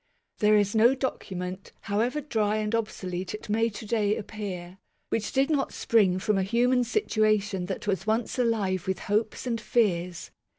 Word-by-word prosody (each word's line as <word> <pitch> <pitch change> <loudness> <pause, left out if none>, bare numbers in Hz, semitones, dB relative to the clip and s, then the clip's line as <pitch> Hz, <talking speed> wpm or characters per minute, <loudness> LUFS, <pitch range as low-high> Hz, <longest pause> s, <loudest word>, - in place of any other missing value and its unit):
There 210 -1 +5
is 205 -1 +2
no 230 +4 +5
document, 185 -8 -4
however 230 +9 0
dry 215 -7 0
and 215 0 -1
obsolete 190 -5 -3
it 215 - -10
may 225 +2 +2
to 215 +1 -8
day 210 -1 +1
appear, 190 -4 -6 0.3
which 215 -2 -1
did 275 +3 +2
not 280 -3 0
spring 200 -6 +3
from 195 +1 +1
a - - +2
human 245 +5 +2
situation 215 - +1
that 190 - -4
was 195 0 -1
once 225 +3 0
alive 200 -6 0
with 190 -1 0
hopes 215 +3 -1
and 230 -2 -2
fears. 180 -7 0
215 Hz, 165 wpm, -27 LUFS, 190-230 Hz, 0.3 s, There